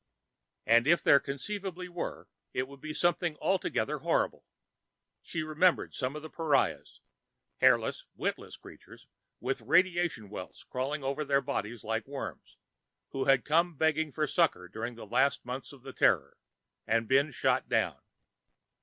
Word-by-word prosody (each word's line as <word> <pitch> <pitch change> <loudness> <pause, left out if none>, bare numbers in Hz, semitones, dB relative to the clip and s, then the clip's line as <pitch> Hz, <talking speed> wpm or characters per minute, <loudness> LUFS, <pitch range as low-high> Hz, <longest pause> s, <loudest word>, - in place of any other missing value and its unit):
And 115 +3 +5
if 170 0 +4
there 140 - +7
conceivably 180 +7 -5
were, 175 -1 -5 0.3
it 130 +1 0
would 140 0 -14
be 155 - -5
something 175 0 +1
altogether 190 - 0
horrible. - - 0 0.7
She 160 -2 -4
remembered 155 +3 +2
some 130 +2 -3
of 150 - -7
the 155 - -7
pariahs 155 -4 0 0.6
hairless, - - +3
witless - - -3
creatures, - - -14 0.3
with - - -2
radiation 175 - +2
welts 90 -3 -8
crawling 135 +3 -3
over 140 +3 -1
their 140 -1 +3
bodies 120 -5 -4
like 110 +2 -2
worms, 140 0 -7 0.5
who 135 -1 -2
had 135 -2 +4
come 165 +3 +2
begging 160 0 +1
for 155 +2 0
succor 155 - +1
during 115 +6 -5
the 115 - -9
last 130 +6 +1
months 125 +2 -5
of 135 -3 -15
the 135 -1 -8
Terror - - +2 0.5
and 115 0 +1
been 140 +4 +4
shot 140 - 0
down. - - +1
140 Hz, 145 wpm, -30 LUFS, 130-165 Hz, 0.7 s, there